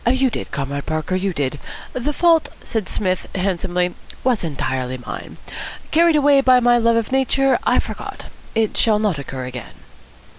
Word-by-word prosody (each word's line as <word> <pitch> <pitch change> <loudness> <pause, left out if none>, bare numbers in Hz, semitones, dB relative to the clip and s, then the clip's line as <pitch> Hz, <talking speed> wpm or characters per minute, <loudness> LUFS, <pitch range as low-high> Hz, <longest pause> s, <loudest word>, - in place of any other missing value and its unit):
"You 260 0 +2
did, - - -5
Comrade 140 0 -4
Parker, 155 +3 -2
you 190 +1 0
did. 145 -3 -2 0.3
The 255 +4 -1
fault," 330 +1 +3
said 220 -4 -3
Psmith 185 -3 -1
handsomely, 180 -1 0 0.3
"was 250 -6 +1
entirely 130 -4 -2
mine. 125 - -8 0.5
Carried 335 0 +5
away 285 -1 +5
by 255 -2 +6
my 240 0 +4
love 230 0 +3
of 230 0 0
nature, 270 0 +2
I - - +4
forgot. - - -4 0.3
It 220 -1 +1
shall 220 -2 +3
not 210 -8 0
occur 130 -2 -5
again." 125 -2 -7
210 Hz, 160 wpm, -20 LUFS, -, 0.5 s, by